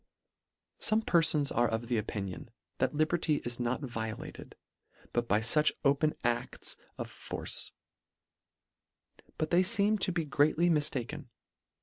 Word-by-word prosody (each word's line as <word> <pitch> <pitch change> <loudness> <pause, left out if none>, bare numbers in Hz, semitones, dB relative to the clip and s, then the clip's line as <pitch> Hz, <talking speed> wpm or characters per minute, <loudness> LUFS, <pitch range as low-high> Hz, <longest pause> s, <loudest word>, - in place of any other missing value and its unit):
Some 220 +1 +2
perfons 160 -6 +3
are 120 +1 +3
of 115 +2 -3
opinion, 105 -3 -3 0.3
that - - 0
liberty 155 0 +1
is 120 0 -2
not 120 +3 -1
violated, 115 -5 -6 0.6
but 120 0 0
by 105 +1 +2
fuch 150 +7 +4
open 145 +2 +3
adls 120 0 -1 0.2
of - - -4
force; - - -2 1.7
but 155 -1 -2
they 175 +1 +5
feem 205 +3 +3
to 185 - +1
be 170 -2 -1
greatly 155 +4 +3
mifta 145 -6 +1
ken. - - -8
145 Hz, 125 wpm, -31 LUFS, 120-165 Hz, 1.7 s, they